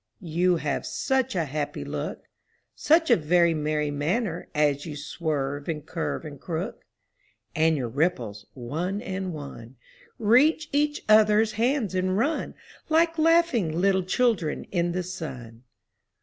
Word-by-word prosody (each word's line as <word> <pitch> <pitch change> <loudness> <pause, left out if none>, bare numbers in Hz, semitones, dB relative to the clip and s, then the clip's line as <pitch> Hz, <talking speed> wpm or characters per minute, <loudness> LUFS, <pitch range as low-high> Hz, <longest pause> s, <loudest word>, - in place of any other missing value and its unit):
You 180 +2 +3
have 150 -4 -2
such 265 -3 0
a 170 -3 +1
happy 145 +1 -4
look - - -5 0.2
— - - -44
Such 320 -2 +3
a - - +8
very 170 0 +3
merry 150 -1 -1
manner, 170 +5 -2
as 145 -1 +2
you 155 -3 -6
swerve 145 -1 -3
and 150 -3 -3
curve 165 -1 -3
and 145 -3 -9
crook 170 +5 -5 0.4
— - - -38 0.3
And 160 0 +3
your 125 -3 -2
ripples, 115 - -2
one 160 +11 -3
and 190 -1 -4
one. 140 -5 -9 0.4
Reach 285 +8 +3
each 295 +1 0
other's 215 0 +5
hands 230 - 0
and 185 +1 0
run 295 +8 -1 0.3
Like 330 +1 +3
laughing 310 - +3
little 190 0 +3
children 185 -4 0
in 175 -2 0
the 180 0 -1
sun 130 -9 -8
175 Hz, 145 wpm, -26 LUFS, 150-220 Hz, 0.4 s, a